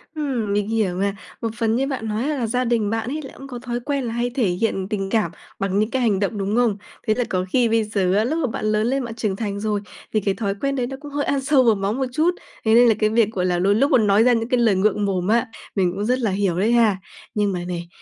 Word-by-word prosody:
Ừm, 250 -9 -1
mình 205 +1 0
hiểu 210 -6 0
mà. 200 +1 -1 0.3
Một 225 - -1
phần 225 -1 +1
như 270 +3 +1
bạn 255 -5 -3
nói 220 +6 -1
là 275 -7 -1
gia 250 +3 0
đình 230 -3 +1
bạn 225 +2 -2
ấy 305 +2 -3
là 270 - -10
cũng 275 - -9
có 245 -3 -7
thói 240 0 -3
quen 280 +1 -2
là 230 -1 -3
hay 240 +1 -1
thể 245 -6 +2
hiện 190 +1 -1
tình 195 -3 -2
cảm 210 -7 +1 0.3
bằng 195 +1 0
những 215 +2 0
cái 260 - 0
hành 210 -5 +2
động, 205 +1 -1
đúng 200 +2 -1
không? 235 -4 +2 0.3
Thế 215 - +4
là 245 - 0
có 185 0 0
khi 245 -3 +3
bây 225 -1 +2
giờ 195 -3 0
á, 215 - +3
lúc 305 +7 -1
mà 295 - +1
bạn - - -4
lớn 215 +1 +1
lên 270 +1 0
bạn 225 -1 -7
trưởng 210 -4 -1
thành 200 -2 -3
rồi 210 -1 -1 0.3
thì 215 - +3
cái 200 -1 0
thói 200 -2 -2
quen 275 0 0
đấy 245 -2 -1
nó 270 - -6
cũng 290 - -9
hơi 285 0 -1
ăn 275 -1 0
sâu 265 -1 +4
vào 225 -3 +4
máu 195 +1 -1
một 265 +1 -1
chút. 315 +7 +2 0.3
Thế 220 - +4
nên 240 +1 +7
là 225 - +5
cái 215 -1 +3
việc, 220 -1 +3
gọi 185 -4 -1
là, 175 -1 +1
đôi 200 +3 +3
lúc 275 +6 +2
muốn 220 -4 +4
nói 200 +3 +5
ra 250 0 +5
những 230 +1 -1
cái 250 - +2
lời 225 -4 +4
ngượng 205 +1 +1
mồm 185 -2 -1
á, 235 +3 +2 0.3
mình 185 -3 +2
cũng 205 +2 -3
rất 250 +2 +1
là 220 -5 0
hiểu 190 -3 0
đấy 220 +4 +2
ha. 225 -5 +4 0.4
Nhưng 205 -2 +1
mà 180 - -2
này, 175 -1 -4
220 Hz, 300 wpm, -22 LUFS, 200-245 Hz, 0.4 s, nên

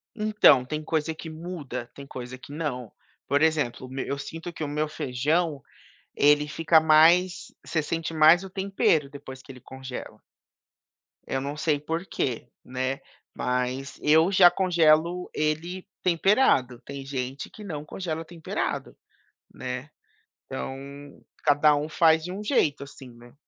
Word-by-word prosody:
Então, 210 - +5
tem 155 +3 -4
coisa 160 0 -1
que 160 +1 -9
muda, 155 -7 -6
tem 140 - -10
coisa 130 -2 -8
que 135 - -13
não, 140 -7 -4 0.4
por 145 +2 +2
exemplo, 150 -6 +1
meu 130 0 -4
eu 140 - -3
sinto 165 +5 -7
que 165 - -6
o - - -2
meu 150 +1 -2
feijão, 150 +2 -1 0.5
ele 150 +1 +4
fica 165 +2 +4
mais 165 +4 +4
você 160 -2 -1
sente 165 +1 -3
mais 160 +3 +6
o 190 - -8
tempero 190 -6 +1
depois 135 -2 -10
que 135 - -12
ele 130 - -13
congela. 130 0 -9 1.1
Eu 135 - -2
não 140 +2 -4
sei 150 -1 +1
porque, 150 -6 -3 0.2
né, 130 +1 -3 0.4
mas 125 +2 -2
eu 160 +4 +4
já 185 -2 +8
congelo 175 -1 +2
ele 160 +5 -2 0.2
temperado, 170 - +3
tem 140 -1 -8
gente 135 0 -4
que 215 - -12
não 155 -7 -6
congela 165 -1 -5
temperado, 165 0 -4 0.6
né. 125 +3 -6 0.6
Então 135 - -5 0.7
cada 150 0 +5
um 145 +1 -2
faz 160 0 +3
de 180 - -5
um 200 +3 -6
jeito, 155 - +1
assim, 135 -2 -12
né. 120 +1 -16
155 Hz, 145 wpm, -26 LUFS, 135-165 Hz, 1.1 s, já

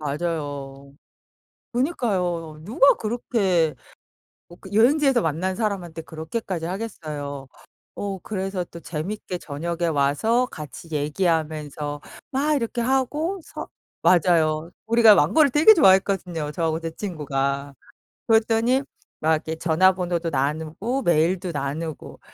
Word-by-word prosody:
맞아요. 145 -3 -4 0.8
그니까요. 185 - -1
누가 255 +8 +5
그렇게 200 - 0 0.7
어 175 - -12
그 190 - -12
여행지에서 265 +3 +4
만난 175 +4 -1
사람한테 185 -7 -3
그렇게까지 165 +2 -5
하겠어요. 155 -8 -5 0.5
어 195 -2 -4
그래서 190 -2 -3
또 170 - -11
재밌게 180 +4 -5
저녁에 170 +2 -3
와서 160 - +2
같이 155 - -10
얘기하면서 150 -2 -1 0.3
막 295 +3 +1
이렇게 235 -2 -2
하고 295 +9 0
서 - - -8 0.3
맞아요. 165 -2 +3 0.2
우리가 225 -2 +7
망고를 305 +3 +4
되게 310 - +7
좋아했거든요, 190 - +3
저하고 160 0 -1
제 165 0 -4
친구가. 140 -6 -3 0.5
그랬더니 225 +3 +3 0.4
막 160 +1 +2
이렇게 160 +1 -3
전화번호도 175 0 +2
나누고 160 - -2
메일도 175 +2 +2
나누고. 150 +2 -5
175 Hz, 285 characters per minute, -23 LUFS, 155-220 Hz, 0.8 s, 우리가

